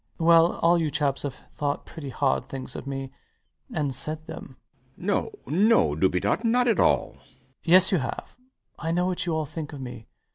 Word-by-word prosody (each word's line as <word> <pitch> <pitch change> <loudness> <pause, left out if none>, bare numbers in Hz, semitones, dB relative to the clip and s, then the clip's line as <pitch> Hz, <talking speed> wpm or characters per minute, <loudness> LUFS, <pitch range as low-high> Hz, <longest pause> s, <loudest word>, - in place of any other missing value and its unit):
Well, 165 0 +5
all 170 0 +4
you 155 - 0
chaps 140 -2 0
have 140 -2 -4 0.2
thought 145 -1 -2
pretty 150 -4 -8
hard 135 +1 0
things 130 -2 -6
of - - -7
me, 135 -1 -5 0.6
and 145 -4 -1
said 155 +4 -3
them. 155 -5 -9 0.4
B. - - -16
B. - - -8
[quite - - +4
overcome] 410 - -3
No, 200 +6 +4
no, 75 - +4
Dubedat. 90 - +1
Not 245 +2 +3
at 230 - +2
all. - - +2
LOUIS. - - -25 0.5
Yes, 185 +2 +6
you 185 - +3
have. 130 - -5 0.4
I 165 - -2
know 175 +1 +1
what 185 -1 -2
you 165 - 0
all 155 -1 -1
think 150 +1 -7
of 145 - -7
me. 120 -3 -8
155 Hz, 210 wpm, -26 LUFS, 135-175 Hz, 0.6 s, Yes